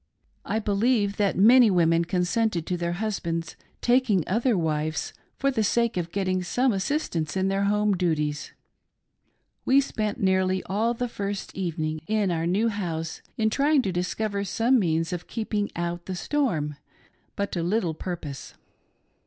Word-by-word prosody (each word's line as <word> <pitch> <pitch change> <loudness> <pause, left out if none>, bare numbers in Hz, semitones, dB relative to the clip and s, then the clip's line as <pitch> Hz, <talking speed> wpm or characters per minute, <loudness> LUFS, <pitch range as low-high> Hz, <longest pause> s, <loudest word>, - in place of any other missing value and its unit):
I 210 - -1
believe, 210 0 +1
that 200 -2 +1
many 235 +4 +7
women 170 -2 +3
consented 180 +1 0
to 180 - -1
their 170 0 -2
husbands 175 -5 -3 0.3
taking 240 -7 +3
other 230 +3 +2
wives 155 -2 -1 0.2
for 275 0 +1
the 225 -4 0
sake 235 +2 +1
of 170 -2 -3
getting 185 -1 0
some 245 +7 +1
assistance 190 - -1
in 190 0 +1
their 195 +1 +1
home 210 0 +2
duties. 150 -4 -1 1.1
We 270 +2 +5
spent 215 -5 -2
nearly 190 -2 +2
all 225 +5 0
the 245 +1 -2
first 200 -3 -5
evening 155 -4 -2
in 210 -3 +1
our 165 0 -1
new 205 +6 +2
house 165 -6 -4 0.2
in 220 -1 +1
trying 285 +2 +3
to 195 - -1
discover 200 +3 -2
:Some 235 +6 +2
means 165 -3 0
of 175 -1 -5
keeping 215 -2 -2
out 170 0 -3
the 190 - -3
storm, 175 - -1 0.6
but 200 0 -2
to 175 - -2
little 175 -1 0
purpose. 160 -5 -6
195 Hz, 155 wpm, -26 LUFS, 170-220 Hz, 1.1 s, many